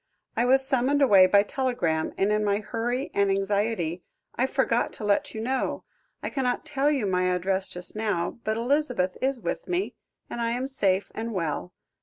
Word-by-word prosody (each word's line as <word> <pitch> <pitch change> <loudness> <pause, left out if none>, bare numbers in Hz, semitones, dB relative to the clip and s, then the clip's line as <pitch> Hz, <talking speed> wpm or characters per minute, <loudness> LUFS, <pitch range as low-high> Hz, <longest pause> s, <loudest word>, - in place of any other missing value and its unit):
"I 235 - +2
was 265 +1 +5
summoned 270 +1 +2
away 195 -8 +7
by 200 +1 +5
telegram, 210 -11 -1
and 195 +2 +2
in 210 0 +1
my 200 -1 +2
hurry 240 +5 -3
and 200 0 +2
anxiety, 195 -3 0 0.3
I 260 - +1
forgot 265 -3 +1
to - - -9
let 205 +1 +1
you 220 - -3
know. 260 +3 -1 0.4
I - - -3
cannot 250 -1 -1
tell 290 -1 +1
you 275 -7 +1
my 185 -1 +1
address 185 +1 0
just 180 +2 -5
now, 210 -4 -1
but 220 0 -1
Elizabeth 245 -7 0
is 265 -1 0
with - - -4
me, 365 +2 -1 0.3
and 235 - -5
I 230 0 0
am 250 +2 -2
safe 200 -8 0
and 225 +1 -4
well. 155 - -2
220 Hz, 185 wpm, -26 LUFS, 195-260 Hz, 0.4 s, away